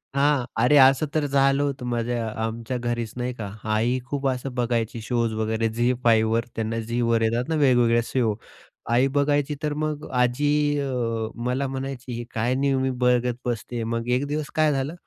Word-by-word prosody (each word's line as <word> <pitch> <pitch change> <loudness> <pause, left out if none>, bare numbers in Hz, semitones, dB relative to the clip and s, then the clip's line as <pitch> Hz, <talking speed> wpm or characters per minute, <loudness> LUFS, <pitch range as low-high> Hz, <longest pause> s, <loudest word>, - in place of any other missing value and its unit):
हां, 140 -2 +2
अरे 125 +6 +4
असं 135 +2 +6
तर 155 - +2
झालं 140 0 +3
होतं 135 -3 -3
माझ्या 120 -1 -1
अ, - - -6
आमच्या 115 +2 -3
घरीच 120 -2 -3
नाही 125 +1 -2
का, 105 -4 -6 0.2
आई 120 +4 +1
खूप 140 +1 -2
असं 130 0 -2
बघायची 120 -2 -1
शोज 115 -1 -1
वगैरे 110 +1 0
झी-5 115 -1 +2
वर. 115 0 +1
त्यांना 115 0 -2
झीवर 115 0 0
येतात 115 +5 0
ना, 160 - +1
वेगवेगळ्या 120 -5 +4
शो. 115 -5 0 0.6
आई 125 +3 +4
बघायची 145 0 +1
तर 150 -1 0
मग 155 -1 -3
अ, - - -11
आजी 145 +4 +2
अ, 115 -5 -2 0.2
मला 130 +2 0
म्हणायची, 135 -1 -5
"ही 120 +1 -4
काय 120 +3 0
नेहमी 135 -1 +1 0.2
बघत 125 -1 +2
बसते." 120 0 -3
मग 115 +1 -3
एक 140 - -2
दिवस 150 0 -3
काय 155 -1 +3
झालं 135 +3 -2
125 Hz, 180 wpm, -24 LUFS, 115-135 Hz, 0.6 s, असं